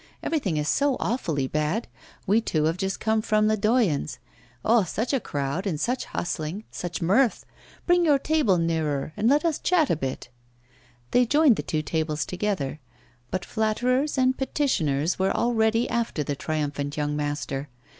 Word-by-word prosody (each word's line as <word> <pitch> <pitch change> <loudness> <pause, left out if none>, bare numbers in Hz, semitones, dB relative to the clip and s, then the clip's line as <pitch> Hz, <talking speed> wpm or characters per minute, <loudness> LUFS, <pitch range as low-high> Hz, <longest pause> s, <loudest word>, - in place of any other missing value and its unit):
Everything 210 - -1
is 150 0 -1
so 280 - +2
awfully 165 - -1
bad. 155 - -1 0.4
We 210 +4 +3
two 155 -8 0
have 160 +2 +1
just 190 +1 -2
come 220 0 +1
from 215 -1 +2
Ledoyen's. 215 - +1 0.5
Oh! 230 +1 +5
such 220 - -2
a 270 - +3
crowd 145 - -3
and 160 -6 -2
such 250 +7 -1
hustling, 175 +3 -4
such 175 0 -4
mirth! 220 +8 +2 0.4
Bring 350 0 +4
your 295 -4 +5
table 280 - +2
nearer 155 -3 -1
and 215 +3 +2
let 295 +4 +3
us 325 -3 +1
chat 340 -5 +2
a - - +3
bit.' 135 -4 -5 0.8
They 245 -1 +4
joined 290 -1 +5
the - - -2
two 155 -1 -2
tables 155 -2 -1
together. 180 -7 -2 0.5
But 185 -1 -3
flatterers 250 +6 0
and 260 0 +3
petitioners 175 - 0
were 190 +1 +2
already 225 0 +2
after 230 -10 -1
the 145 0 -3
triumphant 145 -1 -3
young 150 0 -1
master. 145 -1 -3
195 Hz, 160 wpm, -25 LUFS, 155-245 Hz, 0.8 s, Oh